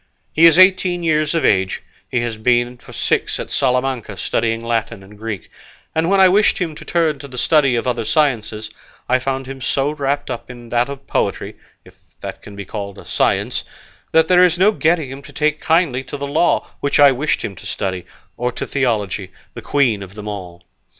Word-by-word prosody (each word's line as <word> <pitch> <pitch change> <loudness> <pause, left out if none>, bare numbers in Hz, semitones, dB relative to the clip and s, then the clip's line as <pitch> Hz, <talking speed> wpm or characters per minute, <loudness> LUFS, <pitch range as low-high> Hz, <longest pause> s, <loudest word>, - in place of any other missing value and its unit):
He 165 - +5
is 165 0 +7
eighteen 185 -2 +4
years 155 -1 +1
of 165 - +1
age; 95 -1 +1 0.3
he 120 - 0
has 120 -1 -2
been 120 +2 +1
for 120 - -15
six - - 0
at - - -6
Salamanca 125 -5 0
studying 115 +2 -1
Latin 115 -3 -2
and 100 +2 -15
Greek, 105 -2 -6 0.4
and 160 +2 +1
when 195 0 +3
I 190 - +8
wished 205 +3 +3
him 170 -4 -2
to - - -11
turn 160 -4 0
to 140 - -9
the 125 -2 -10
study 140 0 +3
of 115 - -1
other 120 -2 -1
sciences 110 -6 0 0.4
I 130 +1 +3
found 135 +1 -3
him 135 0 -8
so 135 +3 0
wrapped 145 -1 -2
up 120 - -6
in 120 -2 -11
that 120 +2 +1
of 140 -1 -8
poetry - - -1 0.3
(if - - -18 0.2
that - - -7
can 100 - -12
be 100 0 -7
called 100 0 -6
a - - -12
science) - - 0 0.5
that 160 0 +4
there 180 +1 +6
is 180 -1 +3
no 195 +4 +5
getting 160 -7 +1
him 135 +1 -8
to 145 - -13
take 150 +1 0
kindly 160 -6 +2
to 145 - -6
the 140 - -4
law, 155 +5 +1
which 140 - 0
I 145 -1 +8
wished 135 +4 -1
him 100 - -6
to - - -9
study, 95 -2 -3 0.3
or 125 0 -1
to - - -4
theology, 105 -8 -1 0.2
the - - -8
queen 125 -8 +1
of 95 0 -10
them 105 0 -8
all. 90 -4 -7
130 Hz, 210 wpm, -19 LUFS, 115-155 Hz, 0.5 s, I